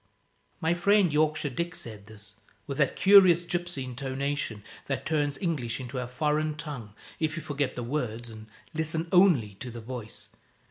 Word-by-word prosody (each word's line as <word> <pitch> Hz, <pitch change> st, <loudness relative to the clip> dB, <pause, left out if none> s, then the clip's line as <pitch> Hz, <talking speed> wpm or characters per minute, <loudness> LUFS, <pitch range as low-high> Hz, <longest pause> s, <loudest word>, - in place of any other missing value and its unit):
My 160 Hz, +1 st, +2 dB
friend 185 Hz, -1 st, +3 dB
Yorkshire 155 Hz, -1 st, +2 dB
Dick 170 Hz, +6 st, -3 dB
said 105 Hz, -7 st, -9 dB
this, 105 Hz, -1 st, -12 dB, 0.3 s
with 140 Hz, 0 st, -5 dB
that 140 Hz, -, +2 dB
curious 185 Hz, -3 st, +7 dB
gypsy 175 Hz, -5 st, -2 dB
intonation 130 Hz, -3 st, -3 dB, 0.2 s
that 135 Hz, -, -2 dB
turns 145 Hz, -3 st, 0 dB
English 145 Hz, -, -2 dB
into 130 Hz, 0 st, -5 dB
a 125 Hz, -, -3 dB
foreign 150 Hz, +3 st, 0 dB
tongue 140 Hz, -9 st, -7 dB, 0.2 s
if 155 Hz, 0 st, -1 dB
you 165 Hz, -, -4 dB
forget 145 Hz, -3 st, -2 dB
the 125 Hz, -, -3 dB
words 120 Hz, -3 st, -3 dB
and 110 Hz, 0 st, -11 dB, 0.3 s
listen 160 Hz, +1 st, -1 dB
only 170 Hz, -, +5 dB
to 130 Hz, -, -6 dB
the 120 Hz, 0 st, -7 dB
voice. 115 Hz, -1 st, -7 dB
145 Hz, 165 wpm, -28 LUFS, 120-160 Hz, 0.3 s, curious